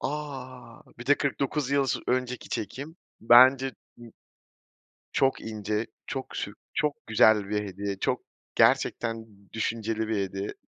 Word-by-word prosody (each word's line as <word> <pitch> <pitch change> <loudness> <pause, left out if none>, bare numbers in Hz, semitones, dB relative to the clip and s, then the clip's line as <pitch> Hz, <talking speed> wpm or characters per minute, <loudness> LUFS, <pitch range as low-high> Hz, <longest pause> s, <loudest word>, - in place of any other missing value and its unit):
A! 130 -5 -6 0.2
Bir 120 - -9
de 145 - +6
49 140 0 -1
yıl 140 -1 +2
sı - - -1
önceki 125 0 -1
çekim. 140 - -5 0.2
Bence 130 +3 +7
ı 130 - -4 1.4
çok 135 0 +2
ince 110 0 -3 0.2
çok 135 -1 -5
sü 100 - -3 0.5
güzel 110 -2 +4
bir 105 0 -1
hediye 100 0 -4
çok - - -1 0.3
gerçekten 115 -1 +2 0.3
düşünceli 110 0 -2
bir 110 - 0
hediye. 95 +1 -5
115 Hz, 125 wpm, -27 LUFS, 105-135 Hz, 1.4 s, Bence